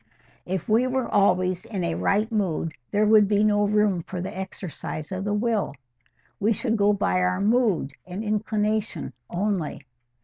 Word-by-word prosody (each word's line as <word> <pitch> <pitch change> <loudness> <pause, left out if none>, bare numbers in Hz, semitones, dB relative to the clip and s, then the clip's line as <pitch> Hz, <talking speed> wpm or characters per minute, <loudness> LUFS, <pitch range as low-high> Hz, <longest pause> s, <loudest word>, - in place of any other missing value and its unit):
"If 185 -1 -3
we 230 +4 +3
were 255 -1 -1
always 185 -3 +2
in 195 -5 -4
a 170 -1 0
right 210 +6 +1
mood, 175 -7 -1 0.2
there 210 +1 +2
would 210 -1 +6
be 205 0 +2
no 205 -1 +3
room 210 -3 +2
for 180 +2 -6
the 185 +2 -5
exercise 185 -4 -6
of 190 +1 -3
the 205 - -1
will. 215 -7 0 0.6
We 215 +2 +3
should 225 +1 -1
go 205 -1 +4
by 200 -2 +1
our 180 0 +1
mood 205 - +2
and 185 +4 -5
inclination 215 0 -1 0.2
only. 180 -6 -2
205 Hz, 165 wpm, -25 LUFS, 185-215 Hz, 0.6 s, would